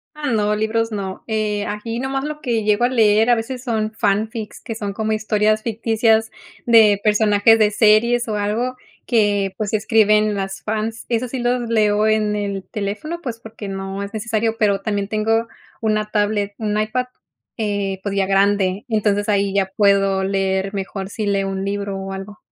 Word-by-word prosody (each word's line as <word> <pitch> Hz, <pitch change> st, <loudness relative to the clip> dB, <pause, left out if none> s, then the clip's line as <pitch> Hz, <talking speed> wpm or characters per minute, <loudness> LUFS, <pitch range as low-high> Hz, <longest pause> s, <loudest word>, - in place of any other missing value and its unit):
Ah, 300 Hz, -1 st, -5 dB
no, 210 Hz, -1 st, +1 dB
libros 225 Hz, +1 st, 0 dB
no. 195 Hz, -3 st, -5 dB
Eh, 210 Hz, -2 st, -1 dB
aquí 225 Hz, +3 st, -4 dB
nomás 270 Hz, +1 st, -2 dB
lo 300 Hz, 0 st, -5 dB
que 235 Hz, -7 st, -1 dB
llego 210 Hz, +3 st, +2 dB
a -, -, +4 dB
leer 225 Hz, -2 st, +3 dB
a 240 Hz, -, +7 dB
veces 250 Hz, +3 st, -5 dB
son 220 Hz, -4 st, -1 dB
fanfics, 215 Hz, +1 st, -1 dB
que 225 Hz, -, -6 dB
son 205 Hz, -2 st, -4 dB
como 220 Hz, +1 st, -2 dB
historias 215 Hz, 0 st, +1 dB
ficticias 225 Hz, 0 st, +1 dB, 0.4 s
de 220 Hz, -4 st, +6 dB
personajes 210 Hz, +1 st, +4 dB
de 215 Hz, -1 st, +4 dB
series 225 Hz, +3 st, +3 dB
o 215 Hz, -, -1 dB
algo 225 Hz, +5 st, -1 dB, 0.3 s
que 205 Hz, -4 st, +1 dB
pues 215 Hz, -1 st, -3 dB
escriben 215 Hz, -1 st, +3 dB
las 195 Hz, 0 st, -4 dB
fans. 220 Hz, +1 st, -3 dB
Esos 240 Hz, +1 st, -1 dB
sí 260 Hz, -, -3 dB
los 245 Hz, 0 st, 0 dB
leo 215 Hz, -2 st, +2 dB
en 215 Hz, -1 st, +1 dB
el 200 Hz, -2 st, -3 dB
teléfono, 210 Hz, +12 st, -4 dB
pues 235 Hz, -4 st, -5 dB
porque 225 Hz, -2 st, -9 dB
no 195 Hz, 0 st, -5 dB
es 200 Hz, -, -6 dB
necesario, 225 Hz, +1 st, -1 dB
pero 200 Hz, -3 st, +2 dB
también 200 Hz, -1 st, -2 dB
tengo 225 Hz, +2 st, +1 dB, 0.3 s
una 215 Hz, -1 st, 0 dB
tablet, 205 Hz, -1 st, 0 dB
un 210 Hz, -1 st, -1 dB
iPad, 235 Hz, +4 st, -1 dB, 0.5 s
eh, 200 Hz, -3 st, -2 dB
pues 200 Hz, 0 st, -3 dB
ya 195 Hz, -1 st, +2 dB
grande. 195 Hz, +1 st, +2 dB
Entonces 205 Hz, -2 st, 0 dB
ahí 200 Hz, -1 st, +1 dB
ya 195 Hz, -1 st, +1 dB
puedo 195 Hz, -2 st, +3 dB
leer 195 Hz, 0 st, -1 dB
mejor 195 Hz, 0 st, -4 dB
si 215 Hz, 0 st, -4 dB
leo 195 Hz, -1 st, 0 dB
un 195 Hz, 0 st, -3 dB
libro 200 Hz, 0 st, -3 dB
o 195 Hz, 0 st, -5 dB
algo. 195 Hz, +2 st, -8 dB
210 Hz, 180 wpm, -20 LUFS, 200-225 Hz, 0.5 s, a